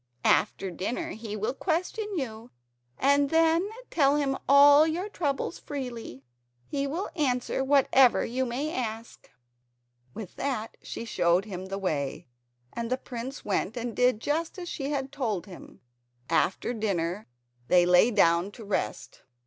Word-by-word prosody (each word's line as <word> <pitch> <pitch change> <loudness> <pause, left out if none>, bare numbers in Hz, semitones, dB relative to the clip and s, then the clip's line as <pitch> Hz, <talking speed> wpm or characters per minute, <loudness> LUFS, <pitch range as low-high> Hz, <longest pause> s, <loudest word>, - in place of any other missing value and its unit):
After 195 -1 +2
dinner 245 - -3
he 220 -1 -6
will 215 +3 -2
question 365 +8 -2
you, 230 -5 -5 0.5
and 280 +1 +3
then 330 +4 +3 0.2
tell 280 -3 +3
him 280 -2 +1
all 285 +2 +8
your 345 +5 -2
troubles 310 -6 -2
freely. 240 - -6 0.4
He 280 -1 -2
will 335 +8 -3
answer 265 -4 0
whatever 270 -2 +4
you 255 +3 -1
may 265 +6 -3
ask." 225 -2 -5 0.9
With 205 -5 -8
that 255 -5 -3
she 230 - -6
showed 180 -3 +2
him 190 -3 -6
the 195 +1 -4
way, 150 -8 -2 0.5
and 235 -1 -4
the 255 - 0
prince 260 +1 -7
went 210 +2 -1
and 240 -1 -4
did 250 -3 +3
just 320 - -2
as 355 -1 -6
she 280 -4 -4
had 270 -2 -2
told 230 -10 -2
him. 190 -4 -13 0.5
After 195 +6 +1
dinner 200 -3 -2 0.4
they 175 -1 +5
lay 180 +6 +5
down 175 -4 +3
to 225 - -10
rest. 200 - -3
250 Hz, 145 wpm, -27 LUFS, 210-285 Hz, 0.9 s, all